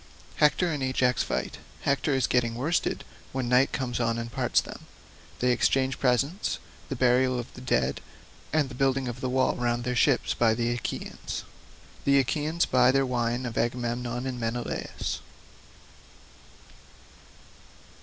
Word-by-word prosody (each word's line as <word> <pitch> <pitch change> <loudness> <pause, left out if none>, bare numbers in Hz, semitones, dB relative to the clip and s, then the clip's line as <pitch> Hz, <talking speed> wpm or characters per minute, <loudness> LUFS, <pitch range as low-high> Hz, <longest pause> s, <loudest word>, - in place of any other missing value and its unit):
Hector 160 +3 +3
and 145 -3 -3
Ajax 130 -1 +2
fight—Hector 140 0 -2
is 130 -2 +2
getting 120 -2 +1
worsted 150 +8 0 0.3
when 130 -2 -1
night 125 +2 +4
comes 125 -3 -2
on 115 -1 +1
and 115 0 -4
parts - - +2
them—They 125 0 -5
exchange 130 +2 +2
presents—The 135 - -1
burial 125 0 +3
of 120 -1 -6
the 125 - -10
dead, 65 - 0 0.5
and 155 -2 +2
the 130 - -10
building 135 0 +1
of 125 +2 -6
a 130 - 0
wall 130 +1 +2
round 120 0 0
their 125 +1 -1
ships 130 +1 +3
by 115 -2 +3
the 120 +1 0
Achaeans—The 140 +3 -4
Achaeans 150 +5 +1
buy 125 -1 +4
their 135 +1 +3
wine 120 0 -1
of 115 -2 -3
Agamemnon 120 +1 -2
and 130 -2 -3
Menelaus. 115 +1 -3
125 Hz, 135 wpm, -27 LUFS, 120-135 Hz, 0.5 s, night